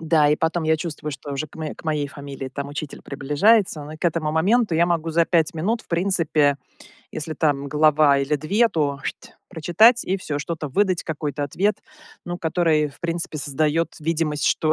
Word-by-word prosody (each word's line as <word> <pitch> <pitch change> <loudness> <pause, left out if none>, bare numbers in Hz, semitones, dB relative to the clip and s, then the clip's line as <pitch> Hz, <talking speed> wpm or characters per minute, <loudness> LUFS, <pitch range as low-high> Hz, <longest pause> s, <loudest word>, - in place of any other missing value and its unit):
Да, 160 -2 +3
и 150 - +3
потом 160 +1 0
я 160 0 +2
чувствую, 155 -2 -5
что 140 0 -7
уже 140 +3 -3
к - - -20
моей 160 -1 -5
к - - -16
моей 150 -2 0
фамилии, 140 -2 -8
там, 140 +1 -6
учитель 145 0 -7
приближается, 150 +5 +2
но 150 - -9
к - - -8
этому 160 -2 0
моменту, 195 +4 +2
я 170 +2 +3
могу 165 -2 -1
за 165 +1 +2
5 165 -3 +2
минут, 215 +9 -1
в - - -26
принципе, 165 -5 +2 0.5
если 155 +1 -5
там 145 -3 0
глава 150 -1 +4
или 140 +2 0
2, 205 +11 +2
то, 145 -7 -1
"шть" - - -6 0.2
прочитать 215 +9 +4
и 190 - 0
всё, 150 -5 -4
что-то 155 0 -4
выдать, 185 +3 +1
какой-то 150 -2 -3
ответ, 195 +9 0 0.5
ну, 175 0 -3
который 160 -2 +1
в 140 - -17
принципе 170 -2 -3
создает 155 +3 0
видимость, 155 -2 -1
что 155 -2 +2
155 Hz, 190 wpm, -22 LUFS, 145-170 Hz, 0.5 s, глава